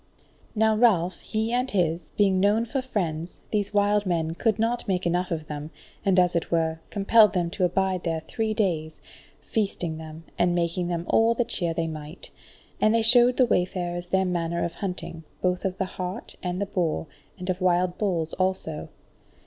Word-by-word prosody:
Now 220 0 +3
Ralph, 190 -6 +3
he 220 +1 -2
and 250 +2 +1
his, 170 -4 0
being 195 -2 +3
known 210 +4 +3
for 265 +3 -2
friends, 175 -9 -3
these 205 -2 0
wild 205 0 +2
men 165 -2 0
could 220 +5 +1
not 230 +2 0
make 185 -2 0
enough 175 +1 0
of 160 -2 -3
them, 150 0 -6 0.3
and 195 -2 +2
as 180 -1 +3
it 170 - -1
were, 160 -1 0
compelled 210 +1 +5
them 175 -3 0
to 185 -1 +1
abide 185 0 0
there 165 -2 -1
three 220 +7 -2
days, 165 -7 -1 0.4
feasting 180 -7 -2
them, 160 0 -9 0.2
and 175 0 +3
making 175 +1 0
them 170 -1 -2
all 230 +1 +4
the 240 - +1
cheer 170 -6 -1
they 165 - 0
might. 155 +1 -8 0.5
And 215 +1 +4
they 230 - +3
showed 245 +2 +5
the 255 - +6
wayfarers 175 -4 -1
their 190 +1 +2
manner 170 -1 -1
of 170 - -2
hunting, 180 -4 -5 0.2
both 180 0 0
of 190 -1 -1
the 190 - 0
hart 185 0 -5
and 180 0 -3
the 200 - 0
boar, 175 -5 -1 0.3
and 180 -1 -7
of 185 +1 -5
wild 180 0 +2
bulls 170 -6 -1
also. 185 -5 -2
180 Hz, 185 wpm, -26 LUFS, 170-210 Hz, 0.5 s, the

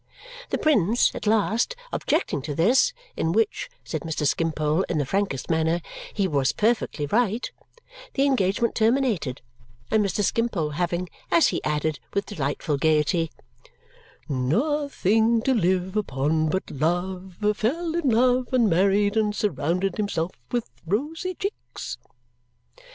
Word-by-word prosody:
The - - 0
prince, 235 - +3
at - - -5
last, 220 - +2 0.2
objecting 285 - 0
to 145 +1 -4
this, 240 - +4 0.2
"in - - 0
which," 450 +1 0
said - - -4
Mr. 160 -2 -2
Skimpole, 155 +1 +1
in 165 - 0
the 145 - +1
frankest 190 -4 -1
manner, 160 +1 +1 0.3
"he 200 -3 0
was 140 -5 +1
perfectly 215 -9 0
right," 225 - 0 0.6
the 275 - +3
engagement 235 -4 +1
terminated, 220 - +1 0.5
and 215 -1 +4
Mr. 200 +1 0
Skimpole 200 -8 0
having 175 +3 -1 0.2
(as 170 -1 +5
he - - -3
added 150 -1 -1 0.2
with 200 0 +1
delightful 150 -4 -2
gaiety) 160 +2 +2 1.0
"nothing 225 - +1
to 265 - +3
live 185 -2 +1
upon 155 -4 0
but 190 +4 -2
love, 180 +5 -2 0.2
fell 315 +11 -1
in 335 -5 +1
love, 250 +1 +3
and 250 -3 +4
married, 200 +3 +3
and 210 -1 +1
surrounded 185 -2 0
himself 185 -5 -1 0.2
with 240 -2 -1 0.2
rosy 315 - -2
cheeks." 400 +2 -6
195 Hz, 130 wpm, -25 LUFS, 160-235 Hz, 1.0 s, as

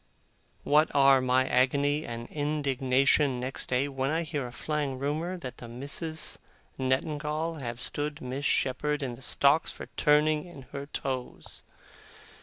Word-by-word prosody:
What 150 +2 +4
are 135 -1 +6
my 130 +1 +3
agony 140 +4 +2
and 115 0 -5
indignation 140 -2 +2
next 130 +2 -3
day, 130 +2 +2
when 135 -1 -2
I 165 +2 +1
hear 145 -5 -3
a - - -9
flying 145 0 -2
rumour 155 +7 -2
that 130 -7 -7
the 120 - -9
Misses 145 +6 -2 0.4
Nettingall 150 +4 -1
have 120 -2 -5
stood 145 +3 -3
Miss 130 +2 -4
Shepherd 145 +3 +1
in 125 -2 -3
the 120 - -12
stocks 140 +4 +3
for - - -8
turning 150 +1 +3
in 150 -6 -11
her 140 0 -5
toes! 130 -3 -4
140 Hz, 145 wpm, -29 LUFS, 130-150 Hz, 0.4 s, are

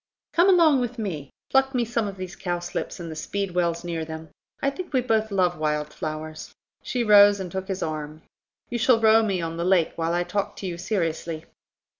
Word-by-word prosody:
Come 345 +3 +5
along 330 -7 +6
with 245 0 -3
me; 165 -11 -4 0.2
pluck 270 0 +3
me 240 -1 +2
some 230 -2 -1
of 195 -1 -6
these 185 0 -6
cowslips, 175 -1 -4
and 170 -2 -6
the - - -6
speedwells 175 -1 -1
near 170 -2 -3
them; 160 0 -7 0.3
I 275 - +1
think 360 +6 -7
we 260 - +3
both 220 -3 +1
love 180 -4 +1
wild 150 -1 -1
flowers." 155 0 -6 0.3
She 245 -2 -1
rose 205 -2 +7
and 185 -2 -5
took 190 +1 -4
his 190 -1 -3
arm. 155 0 -5 0.5
"You 240 - -1
shall 230 0 +4
row 220 0 +6
me 195 -5 0
on 165 0 -4
the 170 - -1
lake 180 -2 +3
while 165 0 0
I 175 0 +1
talk 200 +2 -2
to - - -7
you 175 -2 -4
seriously." 165 -4 -2
185 Hz, 205 wpm, -25 LUFS, 165-220 Hz, 0.5 s, rose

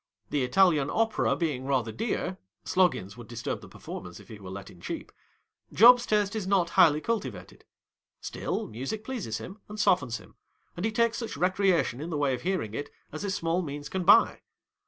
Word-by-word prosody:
The 145 - +1
Italian 150 0 +3
Opera 225 0 +1
being 145 -7 -2
rather 125 -5 0
dear 200 - -3 0.3
(Sloggins 175 - +1
would 120 -2 -10
disturb 120 -1 -4
the - - -11
performance - - -9
if - - -16
he 110 - -10
were 95 -2 -9
let 100 +1 -8
in 85 - -17
cheap), - - -6 0.6
Job's 245 +3 +7
taste 210 -1 +1
is 210 -4 -3
not 190 -3 +2
highly 150 -3 +5
cultivated; 190 - -4 0.5
still, - - -3
music 135 - -5
pleases 225 - -4
him 195 +4 -9
and 210 +1 -7
softens 130 - +2
him, - - -16 0.4
and 175 - -3
he - - -2
takes 230 +1 +1
such 230 -10 -5
recreation 180 -6 +1
in 160 - -5
the 160 - -2
way 140 -2 +1
of 125 - -4
heai 185 -6 -1
ing 105 - -11
it 145 +5 -4 0.2
as 155 - -6
his 200 -1 -2
small 165 +1 0
means 145 -2 -6
can 190 +2 -2
buy. 195 - +6
170 Hz, 195 wpm, -28 LUFS, 130-200 Hz, 0.6 s, Job's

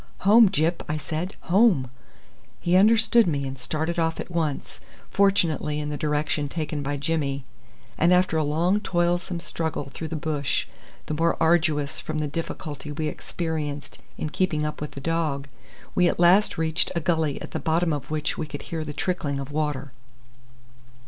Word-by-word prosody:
"Home, 215 +2 +7
Gyp!" 170 -1 +1
I 155 - 0
said. 160 +5 -4
"Home!" 180 - +3 0.7
He 175 +1 +1
understood 225 +3 +5
me 140 -4 0
and 135 0 -4
started 155 +7 -2
off 165 0 0
at - - -6
once, 160 -4 -2 0.3
fortunately 165 -6 +2
in 150 0 -3
the 150 - -2
direction 150 0 -1
taken 155 -1 -3
by 145 +1 -2
Jimmy, 140 -2 -1 0.5
and 170 +2 +4
after 180 -2 +4
a 160 - +2
long 170 +7 +2
toilsome 175 -2 0
struggle 160 -4 -3
through 160 - -5
the 160 - -4
bush, 150 -2 -1 0.4
the - - -3
more 165 +2 +1
arduous 160 -3 +2
from 155 - -4
the 150 -1 -1
difficulty 150 -1 -5
we 155 +1 -2
experienced 150 -3 -4 0.2
in 155 - -3
keeping 155 -5 0
up 150 - -4
with 150 - -5
the 140 - -7
dog, 155 -3 -1 0.5
we 180 - +4
at - - -3
last 180 +4 +5
reached 160 0 +1
a - - +2
gully 160 -3 0
at - - -8
the - - -3
bottom 165 0 +1
of 145 -3 -4
which 155 -1 -2
we 155 - -2
could - - -7
hear 160 -1 -4
the 150 -1 -6
trickling 145 -2 -1
of 135 +1 -6
water. 145 -3 -2
155 Hz, 175 wpm, -25 LUFS, 145-170 Hz, 0.7 s, Home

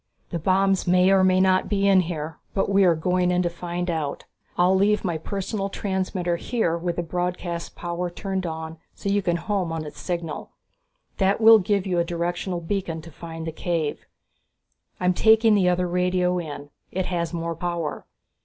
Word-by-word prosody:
"... - - -43
The 170 - -2
bombs 190 +3 +2
may 180 +1 +5
or 190 -1 +5
may 185 0 +4
not 185 0 +3
be 200 -1 +2
in 195 -1 +6
here, 160 -3 -3 0.2
but 195 0 +1
we 195 0 +5
are 170 -2 +5
going 180 +2 +1
in 180 0 +2
to 175 - -1
find 175 +1 -4
out. 160 -4 -3 0.3
I'll 180 +1 +4
leave 205 +2 +2
my 170 -3 -1
personal 195 +3 -3
transmitter 185 -3 -2
here 220 -5 0
with 170 0 -2
the 175 - -2
broadcast 175 0 -3
power 175 0 -3
turned 190 0 -3
on, 160 0 -6 0.2
so 200 - -4
you 200 +1 +2
can 175 -3 0
home 180 0 -1
on 160 -1 -3
its 150 - -9
signal. 170 -3 -4 0.7
That 195 +1 +2
will 225 0 +8
give 200 0 0
you 180 -2 0
a - - +3
directional 175 +1 -2
beacon 165 -2 -3
to 165 - -11
find 165 +1 -8
the 160 - -3
cave. 160 -2 -2 0.9
I'm 180 0 +2
taking 220 +3 +5
the 190 -3 +4
other 180 0 +1
radio 180 0 +1
in 145 -3 -7 0.2
it 185 0 -1
has 170 -2 -2
more 170 -1 -3
power. 170 -2 -3
180 Hz, 190 wpm, -24 LUFS, 170-190 Hz, 0.9 s, will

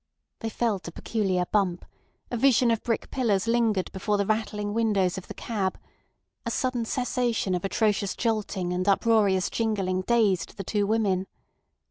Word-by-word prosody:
They 225 - -3
felt 210 -6 -1
a - - -5
peculiar 190 -3 -1
bump; 190 -4 +1 0.5
a - - -1
vision 245 -1 +4
of 225 - 0
brick 230 -2 -2
pillars 220 -7 +1
lingered 230 -5 +1
before 205 +2 -1
the 200 - +1
rattling 210 -1 -1
windows 210 -5 +1
of 190 - -7
the - - -8
cab; 200 -5 -2 0.7
a - - -3
sudden 255 -3 -1
cessation 245 -5 0
of 180 - -1
atrocious 200 0 0
jolting 210 -6 -1
and 185 +2 -2
uproarious 200 -2 +3
jingling 195 -5 0
dazed 205 -5 +1
the 195 - -4
two 205 +1 0
women. 200 -4 +1
210 Hz, 155 wpm, -26 LUFS, 190-230 Hz, 0.7 s, vision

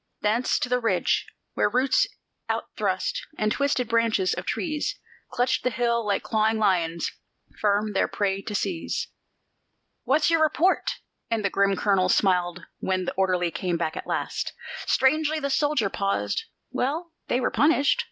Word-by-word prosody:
Thence 220 +4 +2
to - - -1
the 250 0 +1
ridge, 230 -2 +1 0.3
where - - +2
roots 265 - +3 0.4
out - - -2
thrust, - - -1 0.2
and 215 0 +1
twisted 280 -3 +1
branches 225 -4 +2
of - - -5
trees 305 -4 -2 0.3
Clutched 255 +1 0
the 250 - +2
hill 235 -1 0
like 205 -2 0
clawing 220 0 +1
lions, 175 -6 +1 0.5
firm 210 0 +1
their 195 - +2
prey 195 -1 -1
to 210 - -5
seize. 185 -5 -2 0.9
"What's 300 +5 +3
your 330 -1 +3
report?" 315 +4 +2 0.4
and 225 -3 0
the 200 - +1
grim 200 0 +2
colonel 190 -2 +2
smiled 180 -2 +2
when 185 -1 -1
the - - -2
orderly 180 -2 +1
came 170 +1 -1
back 160 -1 -2
at - - -6
last. - - -2 0.3
Strangely 310 +3 +2
the 280 -1 -2
soldier 290 -6 +2
paused: 195 - -1 0.3
"Well, 320 +6 -2
they 245 - +1
were 255 - 0
punished." 290 - +3
220 Hz, 155 wpm, -25 LUFS, 190-275 Hz, 0.9 s, roots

